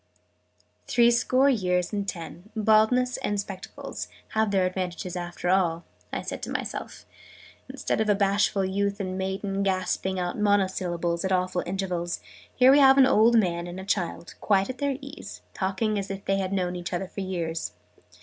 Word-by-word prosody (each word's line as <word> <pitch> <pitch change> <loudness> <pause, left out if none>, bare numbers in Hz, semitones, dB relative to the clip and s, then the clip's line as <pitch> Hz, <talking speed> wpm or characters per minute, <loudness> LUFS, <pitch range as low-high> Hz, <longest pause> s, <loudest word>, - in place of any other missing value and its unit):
"Three 235 0 +5
score 255 +3 +3
years 180 -7 +1
and 200 -1 -2
ten, 175 +2 -8
baldness, 220 +4 +3
and 205 0 -2
spectacles, 195 -2 -6 0.2
have 220 -1 +1
their 195 -2 +2
advantages 185 0 -3
after 175 0 -4
all!", 175 -3 +2 0.3
I - - -3
said - - -5
to - - -5
myself. - - -5 0.6
"Instead - - -1
of 215 - 0
a 205 - +5
bashful 200 0 +2
youth 200 +2 -1
and 185 -2 -3
maiden, 195 +1 -2
gasping 190 0 0
out 180 +2 -2
monosyllables 185 -4 +1
at 190 - -1
awful 185 -1 +1
intervals, 180 -2 -2 0.4
here 255 +1 +7
we 285 - +6
have 270 -1 +7
an 270 - +8
old 235 -2 +5
man 175 -4 +1
and 175 +1 -7
a 190 - -7
child, 175 -3 -2
quite 195 +2 +2
at 255 - -13
their 280 -2 0
ease, 280 +4 -9
talking 210 +2 -1
as 195 - -5
if 195 0 -6
they 195 - +1
had 190 -1 -2
known 180 -2 -1
each 175 0 -5
other 180 +2 -1
for 200 - -6
years! 170 -4 -3
195 Hz, 175 wpm, -26 LUFS, 180-215 Hz, 0.6 s, an